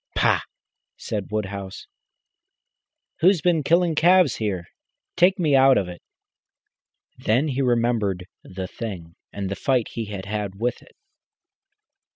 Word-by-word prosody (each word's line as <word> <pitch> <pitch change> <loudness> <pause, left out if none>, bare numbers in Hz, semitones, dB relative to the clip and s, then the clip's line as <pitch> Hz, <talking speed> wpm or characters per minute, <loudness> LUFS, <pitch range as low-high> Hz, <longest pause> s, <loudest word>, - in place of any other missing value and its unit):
"Pah!" - - +3 0.6
said 105 -3 -4
Woodhouse. 100 -3 -5 1.3
"Who's 185 +2 +4
been 170 -1 +2
killing 170 +3 +2
calves 175 -2 +4
here? 95 -6 -2 0.5
Take 185 +2 +4
me 155 -6 +2
out 135 0 +6
of 100 -3 0
it." 90 -1 -9 1.2
Then 125 +8 +1
he 135 0 -1
remembered 115 -7 0 0.2
the 95 0 -6
Thing, 90 -8 -7 0.2
and 100 -1 -4
the 100 - -3
fight 125 +4 0
he 115 -2 -5
had 100 -2 -7
had 100 -1 -4
with 120 +2 -1
it. - - -21
115 Hz, 130 wpm, -23 LUFS, 100-145 Hz, 1.3 s, out